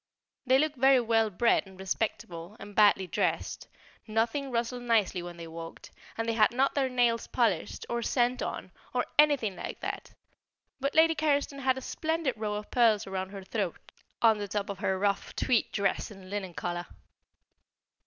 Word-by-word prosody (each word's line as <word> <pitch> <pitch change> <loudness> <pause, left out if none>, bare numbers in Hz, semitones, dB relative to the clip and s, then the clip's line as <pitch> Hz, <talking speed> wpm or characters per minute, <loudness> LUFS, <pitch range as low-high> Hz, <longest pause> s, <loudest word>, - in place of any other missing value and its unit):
They 260 +1 +6
look 305 +1 +1
very 265 +1 +5
well 225 -2 +2
bred 210 +1 +2
and 190 -1 -15
respectable, 195 -1 -3
and 205 - -10
badly 205 -2 +5
dressed; 180 - -2 0.4
nothing 230 +6 0
rustled 240 0 -2
nicely 220 -6 +1
when 175 0 -8
they 170 - -7
walked, 165 0 -9 0.3
and 225 0 -2
they 230 - +1
had 220 -1 +5
not 265 +3 +2
their 270 -2 +1
nails 240 -2 +1
polished, 220 -9 0
or 235 0 -2
scent 245 +1 +1
on, - - -4 0.2
or - - +2
anything 280 -10 +4
like - - -6
that; - - -5 0.7
but 275 +1 -2
Lady 325 +1 +6
Carriston 285 -2 0
had 260 -1 +1
a - - -5
splendid 320 0 -1
row 210 -1 -3
of 210 0 -6
pearls 225 -4 +4
round 190 -1 -4
her 195 -1 -8
throat, 195 -3 -2 0.5
on 220 -2 +5
the 205 - -3
top 205 0 -2
of 195 - -8
her 190 -2 0
rough 200 0 -1
tweed 245 -4 +1
dress 200 -1 0
and 195 -3 -12
linen 190 -4 -4
collar. 175 0 -3
225 Hz, 175 wpm, -29 LUFS, 195-255 Hz, 0.7 s, They